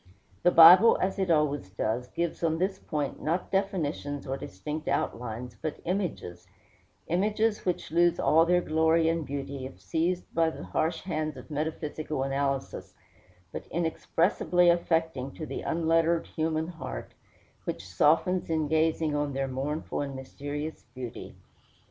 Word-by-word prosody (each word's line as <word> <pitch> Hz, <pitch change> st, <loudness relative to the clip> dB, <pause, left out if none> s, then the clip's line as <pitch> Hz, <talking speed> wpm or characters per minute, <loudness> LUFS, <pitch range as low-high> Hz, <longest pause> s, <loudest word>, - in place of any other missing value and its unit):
The -, -, +5 dB
Bible, 180 Hz, +7 st, +9 dB
as 190 Hz, +2 st, -1 dB
it 190 Hz, -2 st, 0 dB
always 145 Hz, -, +1 dB
does, 110 Hz, +5 st, -2 dB
gives 170 Hz, +4 st, -3 dB
on 160 Hz, -1 st, +2 dB
this 190 Hz, +2 st, -1 dB
point 145 Hz, -3 st, -3 dB
not 170 Hz, +4 st, -1 dB
definitions 155 Hz, -7 st, -1 dB
or 135 Hz, -, -2 dB
distinct 150 Hz, -, -6 dB
outlines, 120 Hz, +1 st, -2 dB
but 155 Hz, -, -4 dB
images 165 Hz, -, -3 dB, 0.6 s
images 210 Hz, +5 st, 0 dB
which 180 Hz, -, -2 dB
lose 170 Hz, +1 st, +3 dB
all 160 Hz, +1 st, +5 dB
their 175 Hz, +1 st, +3 dB
glory 160 Hz, 0 st, +3 dB
and 165 Hz, 0 st, 0 dB
beauty 140 Hz, -1 st, -5 dB
if 135 Hz, -, -15 dB
seized 175 Hz, +3 st, -1 dB
by 165 Hz, -1 st, +3 dB
the 160 Hz, -, -8 dB
harsh 155 Hz, -, -1 dB
hands 155 Hz, -5 st, -3 dB
of 130 Hz, -, -11 dB
metaphysical 150 Hz, -1 st, -3 dB
analysis, 135 Hz, 0 st, -2 dB, 0.6 s
but -, -, -7 dB
inexpressibly 175 Hz, +1 st, +1 dB
affecting 160 Hz, -6 st, 0 dB
to 155 Hz, -, -6 dB
the 135 Hz, -, -5 dB
unlettered 165 Hz, 0 st, +1 dB
human 160 Hz, 0 st, -2 dB
heart, 165 Hz, -2 st, -7 dB, 0.5 s
which 85 Hz, +2 st, -4 dB
softens 160 Hz, -, +2 dB
in 160 Hz, -2 st, 0 dB
gazing 160 Hz, 0 st, +1 dB
on 145 Hz, -1 st, -1 dB
their 135 Hz, 0 st, -1 dB
mournful 140 Hz, +5 st, -3 dB
and 140 Hz, -1 st, -4 dB
mysterious 145 Hz, +3 st, -6 dB
beauty. 125 Hz, -2 st, -7 dB
160 Hz, 140 wpm, -28 LUFS, 140-170 Hz, 0.6 s, Bible